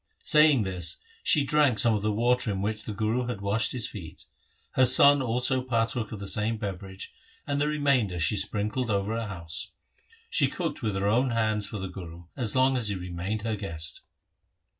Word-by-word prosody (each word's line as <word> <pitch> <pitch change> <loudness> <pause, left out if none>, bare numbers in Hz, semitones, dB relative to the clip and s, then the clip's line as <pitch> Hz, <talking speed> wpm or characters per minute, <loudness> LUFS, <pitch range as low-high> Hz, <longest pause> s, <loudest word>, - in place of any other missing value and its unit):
Saying 150 -6 +5
this 90 -3 -3 0.2
she 150 - +4
drank 140 -4 +3
some 115 0 +5
of 105 - -1
the 105 +1 0
water 120 +2 +1
in 95 -1 -2
which 110 +1 -3
the - - -5
Guru 110 +4 -1
had 120 -5 -4
washed 100 +2 0
his 125 -3 0
feet. 85 -7 -10 0.5
Her 130 - +3
son 140 +3 +7
also 125 +1 +1
partook 115 -2 -1
of 110 - -6
the 100 - -6
same 110 +3 +1
beverage, 95 -2 -7 0.3
and 145 0 -1
the 150 - +2
remainder 140 -11 +1
she 80 +5 +2
sprinkled 105 +4 -2
over 100 +1 -1
her 115 - -5
house. 95 +1 -5 0.6
She - - +3
cooked - - -4
with 105 -4 -2
her 95 +1 -1
own 125 +5 +2
hands 110 -3 0
for 105 - -6
the 95 -1 -4
Guru 85 -2 -10
as 120 -6 -1
long 130 0 +3
as 115 -4 0
he 100 - -1
remained 90 +4 -4
her 110 -1 -1
guest. 80 -6 -4
110 Hz, 195 wpm, -27 LUFS, 100-125 Hz, 0.6 s, son